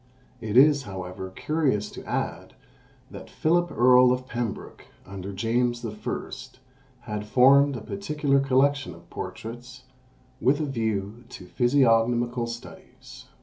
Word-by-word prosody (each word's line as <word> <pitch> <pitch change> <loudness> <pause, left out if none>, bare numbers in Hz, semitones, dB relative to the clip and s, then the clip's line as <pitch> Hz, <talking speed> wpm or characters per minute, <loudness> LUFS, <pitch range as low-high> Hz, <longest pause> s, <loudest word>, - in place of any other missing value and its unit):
It 110 0 -2
is, 145 +1 +6
however, 95 -3 -7
curious 125 0 -1
to - - -10
add, - - -4 0.6
that - - -10
Philip 175 +2 +1
Earl 125 +1 +5
of 125 0 -1
Pembroke, 120 -4 -5 0.2
under 95 0 -7
James 120 +4 -1
I., 105 -1 -5 0.7
had 105 -1 -6
formed 135 +4 +5
a 120 - -6
particular 150 - -1
collection 135 0 +1
of 85 0 -19
portraits, 120 +3 -8 0.6
with 140 +3 +3
a 155 - -1
view 110 -3 -3
to 125 -8 -10
physiognomical 120 +1 +2
studies. 115 0 -11
120 Hz, 120 wpm, -25 LUFS, 110-135 Hz, 0.7 s, is